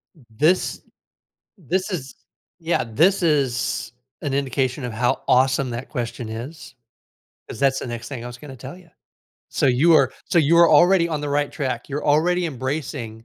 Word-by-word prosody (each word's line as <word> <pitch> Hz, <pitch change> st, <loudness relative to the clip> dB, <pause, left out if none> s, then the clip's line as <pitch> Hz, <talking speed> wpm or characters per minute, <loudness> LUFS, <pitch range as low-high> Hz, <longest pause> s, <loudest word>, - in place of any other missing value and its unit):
th 145 Hz, -, -21 dB
this 165 Hz, +9 st, +1 dB, 0.8 s
this 185 Hz, +5 st, -2 dB
is 140 Hz, -7 st, -5 dB, 0.4 s
yeah, 165 Hz, -5 st, 0 dB
this 165 Hz, -, +2 dB
is 135 Hz, -7 st, 0 dB, 0.3 s
an 140 Hz, -2 st, -2 dB
indication 135 Hz, -1 st, -1 dB
of 120 Hz, -, -4 dB
how 120 Hz, +3 st, 0 dB
awesome 130 Hz, 0 st, +3 dB
that 120 Hz, +2 st, -6 dB
question 120 Hz, -3 st, -5 dB
is, 130 Hz, +6 st, -8 dB, 0.7 s
'cause -, -, -8 dB
that's 135 Hz, -1 st, +2 dB
the -, -, -6 dB
next 120 Hz, -1 st, -6 dB
thing 125 Hz, -4 st, -6 dB
I -, -, -6 dB
was 125 Hz, 0 st, -9 dB
gonna 135 Hz, -1 st, -11 dB
tell 130 Hz, +8 st, -10 dB
ya. 175 Hz, -2 st, -19 dB, 0.6 s
So, -, -, 0 dB
you 140 Hz, +7 st, +4 dB
are 135 Hz, -4 st, +4 dB
so 175 Hz, -, +1 dB
you 160 Hz, +2 st, +4 dB
are 170 Hz, -1 st, +7 dB
already 170 Hz, +3 st, +5 dB
on 155 Hz, -2 st, -2 dB
the 145 Hz, -, -4 dB
right 145 Hz, 0 st, 0 dB
track, 130 Hz, -3 st, -4 dB
you're 145 Hz, +2 st, -4 dB
already 170 Hz, +4 st, +2 dB
embracing 130 Hz, -5 st, -5 dB
140 Hz, 175 wpm, -22 LUFS, 125-160 Hz, 0.8 s, are